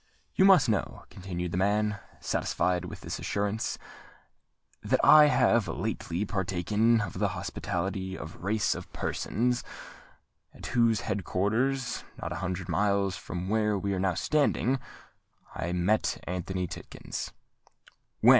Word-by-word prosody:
"You 190 Hz, -, +4 dB
must 190 Hz, -7 st, +7 dB
know," 110 Hz, -4 st, -1 dB
continued 90 Hz, -2 st, -4 dB
the 90 Hz, -, -1 dB
man, 105 Hz, +1 st, +1 dB, 0.2 s
satisfied 90 Hz, -1 st, 0 dB
with -, -, -8 dB
this -, -, -5 dB
assurance, 105 Hz, +2 st, -1 dB, 1.0 s
"that -, -, +1 dB
I 150 Hz, 0 st, +9 dB
have 120 Hz, -5 st, +3 dB
lately 85 Hz, +5 st, -2 dB
partaken 105 Hz, +4 st, +1 dB
of 100 Hz, -5 st, -5 dB
the -, -, 0 dB
hospitality 95 Hz, +1 st, -3 dB
of 80 Hz, +4 st, -7 dB
a -, -, -16 dB
race 105 Hz, +3 st, +1 dB
of -, -, -8 dB
persons, 120 Hz, +3 st, -1 dB, 0.9 s
at -, -, -10 dB
whose 115 Hz, -2 st, +2 dB
head 105 Hz, -4 st, -2 dB
quarters—not 120 Hz, +9 st, -1 dB
a -, -, -2 dB
hundred 90 Hz, -1 st, -3 dB
miles 100 Hz, -2 st, +1 dB
from 90 Hz, -1 st, -5 dB
where 105 Hz, 0 st, +1 dB
we 100 Hz, +1 st, -1 dB
are 95 Hz, -, -1 dB
now 95 Hz, -2 st, +1 dB
standing—I 135 Hz, -, -2 dB
met 90 Hz, +5 st, +1 dB
Anthony 90 Hz, +1 st, -2 dB
Tidkins——" 85 Hz, -, -6 dB, 0.9 s
"When?" -, -, +6 dB
100 Hz, 130 wpm, -29 LUFS, 90-110 Hz, 1.0 s, I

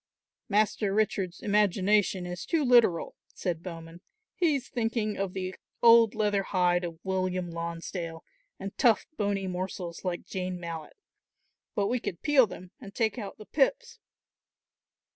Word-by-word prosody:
"Master 210 Hz, 0 st, +2 dB
Richard's 195 Hz, -4 st, 0 dB
imagination 205 Hz, -2 st, +2 dB
is 180 Hz, 0 st, -6 dB
too 320 Hz, -4 st, +1 dB
literal," 240 Hz, -9 st, +4 dB, 0.2 s
said 170 Hz, -3 st, -2 dB
Bowman; 165 Hz, -1 st, -9 dB, 0.3 s
"he's 295 Hz, -7 st, +1 dB
thinking 225 Hz, -3 st, -1 dB
of 195 Hz, -2 st, -3 dB
the 185 Hz, -1 st, -3 dB, 0.3 s
old 230 Hz, -2 st, +7 dB
leather 205 Hz, -2 st, +1 dB
hide 180 Hz, -2 st, +1 dB
of 170 Hz, -2 st, -5 dB
William 185 Hz, -2 st, -1 dB
Lonsdale, 165 Hz, 0 st, -5 dB, 0.4 s
and 195 Hz, 0 st, -6 dB
tough 230 Hz, -6 st, +4 dB
bony 200 Hz, -4 st, -1 dB
morsels 180 Hz, -1 st, -4 dB
like 180 Hz, -2 st, -3 dB
Jane 185 Hz, -1 st, -4 dB
Mallet; 165 Hz, -, -7 dB, 0.8 s
but 200 Hz, -, +1 dB
we 245 Hz, +4 st, 0 dB
could 170 Hz, -6 st, -5 dB
peel 275 Hz, -5 st, +5 dB
them 185 Hz, -2 st, -10 dB
and 200 Hz, -, -11 dB
take 225 Hz, +1 st, 0 dB
out 205 Hz, -3 st, -7 dB
the 215 Hz, -, -11 dB
pips." -, -, 0 dB
195 Hz, 140 wpm, -29 LUFS, 180-220 Hz, 0.8 s, old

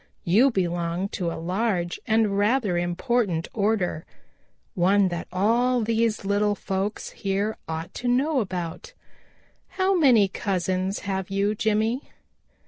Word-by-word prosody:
You 220 Hz, +11 st, +4 dB
belong 175 Hz, -2 st, -1 dB
to 175 Hz, -5 st, -3 dB
a -, -, -5 dB
large 180 Hz, 0 st, -1 dB
and 220 Hz, -2 st, +2 dB
rather 210 Hz, -1 st, +2 dB
important 175 Hz, 0 st, 0 dB
order, 200 Hz, -6 st, 0 dB, 0.7 s
one 195 Hz, 0 st, +3 dB
that 175 Hz, -1 st, -5 dB
all 235 Hz, +6 st, +2 dB
these 225 Hz, -1 st, 0 dB
little 205 Hz, +1 st, +1 dB
folks 195 Hz, +2 st, -3 dB
here 200 Hz, +2 st, -2 dB
ought 160 Hz, +1 st, -5 dB
to 245 Hz, -, -2 dB
know 270 Hz, +4 st, +2 dB
about. 185 Hz, -, -4 dB, 0.8 s
How 380 Hz, 0 st, +3 dB
many 250 Hz, -, +5 dB
cousins 190 Hz, 0 st, -2 dB
have 190 Hz, -1 st, -3 dB
you, 200 Hz, +2 st, +1 dB
Jimmy?" 220 Hz, +4 st, 0 dB
200 Hz, 125 wpm, -25 LUFS, 180-225 Hz, 0.8 s, many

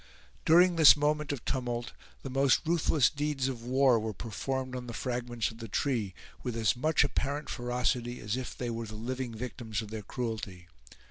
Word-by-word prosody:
During 175 Hz, +2 st, +6 dB
this 155 Hz, -2 st, +9 dB
moment 150 Hz, 0 st, +1 dB
of 140 Hz, -5 st, -5 dB
tumult, 120 Hz, -2 st, -2 dB, 0.3 s
the 135 Hz, -, -5 dB
most 135 Hz, +1 st, +3 dB
ruthless 160 Hz, -4 st, +3 dB
deeds 145 Hz, -2 st, -1 dB
of 125 Hz, -3 st, -4 dB
war 130 Hz, 0 st, +3 dB
were 110 Hz, -1 st, -4 dB
performed 130 Hz, +4 st, -3 dB
on 125 Hz, -1 st, -5 dB
the 120 Hz, -, -6 dB
fragments 120 Hz, -2 st, -2 dB
of 115 Hz, -, -14 dB
the 115 Hz, -, -6 dB
tree, 110 Hz, -4 st, -1 dB, 0.3 s
with 125 Hz, -3 st, -3 dB
as 110 Hz, +1 st, +2 dB
much 155 Hz, +5 st, +3 dB
apparent 145 Hz, +2 st, -2 dB
ferocity 120 Hz, 0 st, -1 dB
as 105 Hz, +2 st, -2 dB
if 130 Hz, -1 st, -5 dB
they 120 Hz, -1 st, -3 dB
were 115 Hz, 0 st, -4 dB
the 105 Hz, -, -8 dB
living 125 Hz, +3 st, -4 dB
victims 115 Hz, -2 st, -4 dB
of 110 Hz, -2 st, -6 dB
their 110 Hz, -1 st, -4 dB
cruelty. 105 Hz, -6 st, -5 dB
125 Hz, 185 wpm, -30 LUFS, 115-135 Hz, 0.3 s, this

